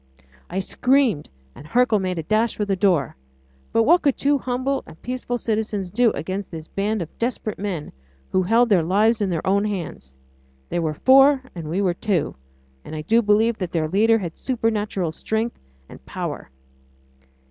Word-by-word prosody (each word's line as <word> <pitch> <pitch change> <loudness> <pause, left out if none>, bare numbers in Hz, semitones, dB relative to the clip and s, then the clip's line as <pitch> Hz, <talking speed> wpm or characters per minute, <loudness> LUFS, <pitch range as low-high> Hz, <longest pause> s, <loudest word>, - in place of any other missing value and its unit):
I 180 - -4
screamed, 245 - +1 0.2
and 150 - -13
Hercule 235 +3 +3
made 185 -2 -2
a 165 - -3
dash 215 +5 +1
for 210 - 0
the 195 -1 0
door; 180 - +1 0.6
but 230 - +3
what 345 +8 +5
could 280 -3 +1
two 285 0 +2
humble 255 +2 -1
and 160 - -13
peaceful 250 0 -3
citizens 210 -4 -2
do 235 +3 +4
against 185 +6 -4
this 160 -2 -8
band 205 0 -1
of 160 - -14
desperate 230 -2 -2
men, 190 -7 -4 0.4
who 185 - +3
held 230 +6 +3
their 195 -5 +4
lives 210 +7 +2
in 200 - +1
their 165 -3 -2
own 200 +2 +2
hands? 170 - -5 0.5
They - - -1
were 155 -2 -1
four 270 - +5
and 165 -4 -7
we 190 +5 0
were 180 -2 +2
two, 180 -4 -1 0.5
and 155 - -8
I 155 - -5
do 225 +8 +3
believe 220 +1 +2
that 180 -3 -3
their 160 -2 0
leader 220 +6 +3
has 180 -6 -4
supernatural 215 -8 -1
strength 220 +7 -3 0.3
and - - -13
power. - - -5
205 Hz, 180 wpm, -22 LUFS, 175-235 Hz, 0.6 s, what